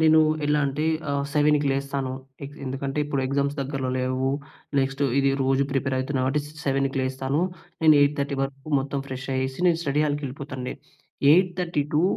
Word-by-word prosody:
నేను 160 Hz, 0 st, +6 dB, 0.2 s
ఎలా 150 Hz, 0 st, +2 dB
అంటే 140 Hz, +3 st, -2 dB, 0.3 s
ఆహ్, 140 Hz, 0 st, 0 dB
7కి 150 Hz, 0 st, +3 dB
లేస్తాను. 135 Hz, -1 st, -2 dB, 0.3 s
ఎ -, -, -4 dB, 0.2 s
ఎందుకంటే 135 Hz, +2 st, -3 dB
ఇప్పుడు 140 Hz, -2 st, -1 dB
ఎగ్జామ్స్ 140 Hz, +1 st, 0 dB
దగ్గరలో 135 Hz, -1 st, -2 dB
లేవు. 130 Hz, +1 st, 0 dB, 0.5 s
నెక్స్ట్ 135 Hz, +1 st, 0 dB, 0.2 s
ఇది 135 Hz, 0 st, +3 dB
రోజు 135 Hz, +1 st, +2 dB
ప్రిపేర్ 130 Hz, -1 st, 0 dB
అయితున్నా 130 Hz, 0 st, -1 dB
అంటే, 150 Hz, +3 st, +1 dB, 0.2 s
7కి 135 Hz, 0 st, 0 dB
లేస్తాను. 130 Hz, +3 st, -1 dB, 0.4 s
నేను 155 Hz, -1 st, +7 dB
8:30 140 Hz, -1 st, +1 dB
వరకు 135 Hz, +1 st, -5 dB
మొత్తం 140 Hz, +1 st, -3 dB
ఫ్రెష్ 130 Hz, 0 st, -5 dB
అయ్యేసి, 130 Hz, +2 st, -2 dB
నేను 165 Hz, -1 st, +2 dB
స్టడీ 150 Hz, -1 st, +1 dB
హాల్‌కెళ్ళిపోతాను 140 Hz, -2 st, -4 dB
అండి. 125 Hz, -, -4 dB, 0.6 s
Eight 180 Hz, +2 st, +4 dB
thirty 170 Hz, -4 st, 0 dB
two 155 Hz, -, +4 dB
140 Hz, 165 wpm, -25 LUFS, 135-145 Hz, 0.6 s, నేను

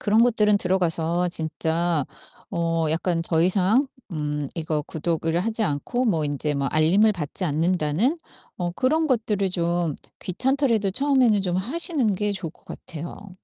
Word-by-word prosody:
그런 220 Hz, +2 st, +4 dB
것들은 210 Hz, -4 st, +3 dB
들어가서 175 Hz, -2 st, 0 dB
진짜 160 Hz, -1 st, -1 dB, 0.5 s
어 165 Hz, -1 st, 0 dB
약간 165 Hz, +1 st, 0 dB
더 165 Hz, -1 st, +1 dB
이상 200 Hz, +9 st, +3 dB, 0.2 s
음 150 Hz, -3 st, -3 dB
이거 155 Hz, -2 st, -1 dB
구독을 165 Hz, +2 st, -2 dB
하지 225 Hz, +3 st, -1 dB
않고 210 Hz, -, -1 dB
뭐 165 Hz, -9 st, +1 dB
인제 145 Hz, +1 st, -1 dB
뭐 140 Hz, -1 st, -1 dB
알림을 180 Hz, +8 st, +4 dB
받지 180 Hz, 0 st, -3 dB
않는다는 170 Hz, -, +1 dB, 0.4 s
어 175 Hz, -1 st, -2 dB
그런 295 Hz, -, +1 dB
것들을 215 Hz, -6 st, 0 dB
좀 170 Hz, -3 st, -1 dB, 0.2 s
귀찮더라도 235 Hz, +1 st, +1 dB
처음에는 255 Hz, -5 st, +3 dB
좀 180 Hz, -1 st, 0 dB
하시는 260 Hz, -, +2 dB
게 210 Hz, +1 st, -1 dB
좋을 185 Hz, -5 st, -4 dB
것 -, -, -27 dB
같아요. 175 Hz, +4 st, -9 dB
180 Hz, 300 characters per minute, -24 LUFS, 160-215 Hz, 0.5 s, 그런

